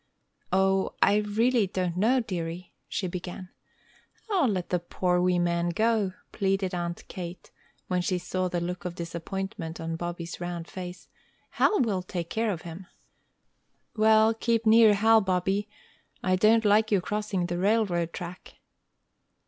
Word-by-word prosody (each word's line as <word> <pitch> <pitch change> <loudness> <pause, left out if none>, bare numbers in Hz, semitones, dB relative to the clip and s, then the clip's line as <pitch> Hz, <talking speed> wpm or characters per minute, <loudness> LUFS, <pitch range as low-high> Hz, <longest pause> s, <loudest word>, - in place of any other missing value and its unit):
"O, 190 +1 +2
I 205 - +4
really 215 +2 +2
don't 180 -2 -2
know, 235 +7 +3
dearie!" 175 -4 -5
she 190 - -3
began. 180 +1 -6 0.8
"O, 365 -9 +3
let 185 -4 -2
the 180 - +2
poor 180 +1 0
wee 180 0 +2
man 175 0 +1
go!" 215 0 +1 0.2
pleaded 195 -1 0
Aunt 170 -1 -4
Kate, 180 -1 -8 0.4
when 180 -1 0
she 180 +1 0
saw 185 +1 -2
the 175 -1 -2
look 180 +3 -4
of 180 -1 -5
disappointment 170 0 -5
on 165 0 -3
Bobby's 175 0 -5
round 175 -1 -4
face. 180 -1 -8 0.4
"Hal 425 - +3
will 205 -6 0
take 175 -2 -5
care 225 0 0
of 170 -5 -5
him." 175 +2 -9 1.1
"Well, 220 0 +5
keep 230 0 0
near 220 -1 +7
Hal, 220 +2 +5
Bobby. 195 +2 0 0.5
I 185 -1 +2
don't 220 +4 +4
like 215 +1 +4
your 200 - +3
crossing 205 -2 -2
the 175 0 -3
railroad 190 -5 +1
track." 180 0 -8
185 Hz, 150 wpm, -27 LUFS, 175-210 Hz, 1.1 s, near